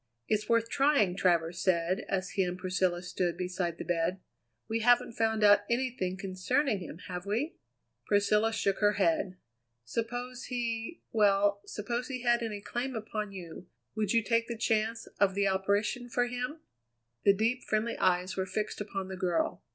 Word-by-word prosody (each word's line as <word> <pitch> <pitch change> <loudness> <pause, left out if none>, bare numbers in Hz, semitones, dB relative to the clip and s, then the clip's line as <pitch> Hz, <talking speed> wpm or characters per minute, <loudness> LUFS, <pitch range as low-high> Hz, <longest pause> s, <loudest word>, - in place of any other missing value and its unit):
"It's 215 0 0
worth 230 -1 +3
trying," 270 -9 +3
Travers 170 -2 +1
said 180 +1 +1
as 190 -1 -1
he 195 - 0
and 180 -1 -1
Priscilla 185 -1 0
stood 180 -1 -1
beside 180 -2 -2
the - - -6
bed. 175 +1 0 0.5
"We 225 0 -1
haven't 245 +2 +4
found 220 -1 +1
out 205 0 +8
anything 235 -7 -1
concerning 195 +6 0
him, 175 - -8
have 180 0 -5
we?" 245 - -1 0.5
Priscilla 210 +2 +3
shook 200 -3 0
her 205 0 +4
head. 185 -1 +1 0.5
"Suppose 245 - -4
he 235 +3 -3
well, 200 -1 +3
suppose 235 +4 -3
he 255 -3 -5
had 240 -1 +3
any 215 -3 -4
claim 245 +4 -3
upon 215 -1 -4
you, 175 -2 -9 0.3
would 215 -3 0
you 230 -1 +3
take 230 +1 +1
the 235 - -4
chance 225 +1 0
of 195 -2 +3
the 200 0 +2
operation 200 +5 0
for 245 +1 +1
him?" 250 +6 -4 0.6
The 200 - +6
deep, 230 +5 0
friendly 220 +2 0
eyes 180 0 +2
were 190 0 -1
fixed 210 +2 -3
upon 195 -2 -4
the 190 - -5
girl. 180 -3 0
205 Hz, 165 wpm, -30 LUFS, 185-230 Hz, 0.6 s, out